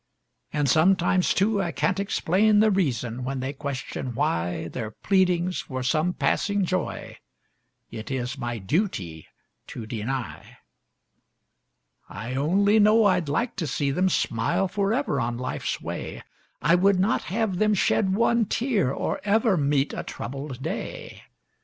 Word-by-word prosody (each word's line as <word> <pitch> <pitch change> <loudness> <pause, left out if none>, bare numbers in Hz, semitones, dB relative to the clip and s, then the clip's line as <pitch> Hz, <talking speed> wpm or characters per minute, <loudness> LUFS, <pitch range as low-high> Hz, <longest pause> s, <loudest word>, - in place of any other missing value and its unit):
And 145 -2 0
sometimes, 180 +5 +3
too, 205 +1 +2
I 175 -3 -2
can't 190 +3 0
explain 200 +2 +2
the 215 0 +5
reason 125 - -1
when 135 +1 -3
they 130 +2 -3
question 135 -3 -5
why 85 -3 -1
Their 110 +4 -5
pleadings 180 - +1
for 130 -1 -5
some 155 +6 +1
passing 200 +1 +1
joy 185 0 -3 0.7
it 110 - -7
is 130 -1 -3
my 120 -3 -4
duty 95 - -2 0.4
to 115 - -7
deny. 120 +3 -5 1.5
I 115 +6 -6
only 195 +10 +3
know 215 +1 +5
I'd 180 -6 +2
like 230 - -1
to 170 -5 -2
see 140 +1 -1
them 185 +6 +2
smile 170 +6 0
forever 200 - 0
on 120 0 -2
life's 125 +1 -3
way; - - -6 0.4
I 165 - +4
would 190 +1 +4
not 195 +4 +1
have 195 -1 -1
them 215 0 +3
shed 190 0 +2
one 235 +1 +3
tear 220 - 0
or - - -2
ever 215 0 +3
meet 140 -2 +1
a - - -3
troubled 135 -1 -6
day. - - -5
170 Hz, 140 wpm, -25 LUFS, 130-200 Hz, 1.5 s, the